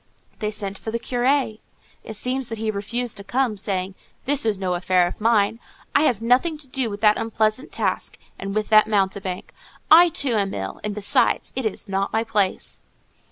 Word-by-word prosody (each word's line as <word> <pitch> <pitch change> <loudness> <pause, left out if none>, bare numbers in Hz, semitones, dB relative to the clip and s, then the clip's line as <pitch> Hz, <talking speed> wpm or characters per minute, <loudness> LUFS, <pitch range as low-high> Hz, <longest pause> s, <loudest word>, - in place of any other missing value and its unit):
They 210 - -1
sent 200 -2 -5
for - - -6
the 230 - -1
curé. 245 -1 0 0.4
It 220 - -7
seems 255 +3 -2
that 225 - -4
he 220 0 -1
refused 230 +4 -3
to 200 - -6
come, 245 0 0
saying, 190 -1 0 0.3
"That 285 +1 +1
is 210 -3 +1
no 185 -1 -1
affair 180 0 +2
of 175 - -6
mine. 220 0 +2 0.3
I 290 - +4
have 230 -5 +1
nothing 260 +7 +2
to 295 -2 -11
do 255 -2 -2
with 205 0 -7
that 210 -1 +4
unpleasant 220 +2 -1
task, - - -2 0.2
and 195 +1 -4
with 215 0 -1
that 215 0 +6
mountebank: 195 -3 -1 0.4
I, 340 +2 +9
too, 280 -5 0
am 200 -3 0
ill; 95 0 -5
and 210 -1 -3
besides, 205 -1 +1
it 260 -4 0
is 210 - -6
not 195 0 -1
my 220 0 +1
place." 205 -4 -1
215 Hz, 195 wpm, -23 LUFS, 200-245 Hz, 0.4 s, I